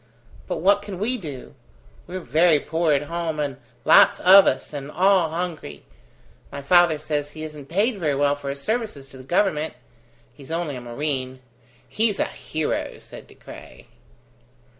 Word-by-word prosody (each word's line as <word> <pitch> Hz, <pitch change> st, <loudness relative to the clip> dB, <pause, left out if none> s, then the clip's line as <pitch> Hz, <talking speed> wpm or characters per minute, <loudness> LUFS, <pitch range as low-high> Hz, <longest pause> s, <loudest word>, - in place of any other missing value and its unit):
But -, -, -3 dB
what 200 Hz, +3 st, +4 dB
can 205 Hz, -2 st, -8 dB
we 225 Hz, +7 st, -1 dB
do? 145 Hz, -9 st, -8 dB, 0.5 s
We're 185 Hz, +2 st, -6 dB
very 160 Hz, +3 st, +3 dB
poor 160 Hz, +2 st, -1 dB
at 145 Hz, 0 st, +2 dB
home, 165 Hz, 0 st, -4 dB
and 140 Hz, -3 st, -3 dB, 0.3 s
lots -, -, +6 dB
of 190 Hz, +2 st, +8 dB
us, -, -, -1 dB
and 140 Hz, -1 st, -6 dB
all 185 Hz, +1 st, +3 dB
hungry. 170 Hz, -, -5 dB, 0.7 s
My 140 Hz, 0 st, -7 dB
father 175 Hz, +1 st, +4 dB
says 145 Hz, -1 st, -3 dB
he 155 Hz, +1 st, -9 dB
isn't 150 Hz, -3 st, -9 dB
paid 205 Hz, +5 st, 0 dB
very 150 Hz, -5 st, 0 dB
well 145 Hz, +1 st, +2 dB
for 140 Hz, -1 st, -7 dB
his 140 Hz, 0 st, -5 dB
services 215 Hz, -, -3 dB
to 135 Hz, -, -13 dB
the 130 Hz, -, -11 dB
Government. 155 Hz, 0 st, 0 dB, 0.6 s
He's 140 Hz, -1 st, -15 dB
only 165 Hz, -3 st, -3 dB
a 125 Hz, -, -7 dB
marine." 130 Hz, +1 st, -4 dB, 0.5 s
"He's 215 Hz, -2 st, 0 dB
a -, -, +1 dB
hero!" 155 Hz, -1 st, -4 dB
said -, -, -12 dB
De -, -, -18 dB
Craye. -, -, -13 dB
155 Hz, 165 wpm, -23 LUFS, 140-180 Hz, 0.7 s, of